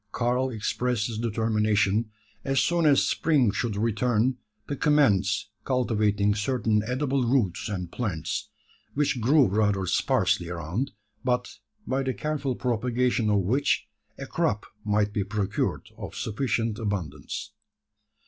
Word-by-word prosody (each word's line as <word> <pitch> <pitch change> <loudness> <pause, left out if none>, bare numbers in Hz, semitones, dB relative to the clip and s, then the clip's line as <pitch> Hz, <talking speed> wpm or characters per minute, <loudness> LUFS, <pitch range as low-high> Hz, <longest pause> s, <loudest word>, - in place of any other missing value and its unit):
Karl 125 +2 0
expressed 120 0 -1
his 110 -2 -4
determination, 110 -1 +1 0.3
as 135 -1 +1
soon 170 -2 +2
as 140 -2 +5
spring 140 -9 +2
should 115 -1 -2
return, 115 +3 +1 0.3
to 145 - -2
commence 110 - +2
cultivating 105 -5 +1
certain 105 0 +1
edible 130 +1 0
roots 115 -9 +1
and 90 -4 -4
plants, 100 -11 -3 0.5
which 140 -4 +1
grew 140 +4 +5
rather 100 -1 +1
sparsely 90 0 +1
around, 90 - -3 0.3
but, 125 -1 -1 0.3
by 130 +1 0
the 130 -1 -2
careful 150 -4 -2
propagation 120 -1 0
of 100 -1 +3
which, 130 +9 +1 0.3
a - - -6
crop 105 +1 -1 0.2
might 105 0 +1
be 100 - 0
procured 105 0 -2
of - - -7
sufficient 115 -1 -1
abundance. 100 - -4
115 Hz, 125 wpm, -26 LUFS, 105-130 Hz, 0.5 s, as